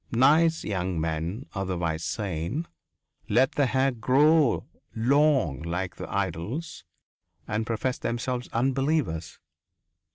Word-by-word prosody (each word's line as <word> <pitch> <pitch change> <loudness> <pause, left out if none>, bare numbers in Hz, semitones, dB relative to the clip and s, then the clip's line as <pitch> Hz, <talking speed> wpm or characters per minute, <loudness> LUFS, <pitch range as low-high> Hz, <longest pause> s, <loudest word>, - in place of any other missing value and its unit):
Nice 155 +7 +4
young 90 -3 -2
men, 80 - -2
otherwise 85 -5 -2
sane, 90 - -3 0.6
let 135 - +4
their 145 -2 +2
hair 130 +2 +2
grow 135 +3 +3 0.3
long 130 - +2
like 85 +2 -3
their - - -7
idol's 100 - -3 0.6
and 110 +1 -2
professed 115 +3 -2
themselves 120 +1 -2
unbelievers. 130 - 0
115 Hz, 100 wpm, -27 LUFS, 85-135 Hz, 0.6 s, Nice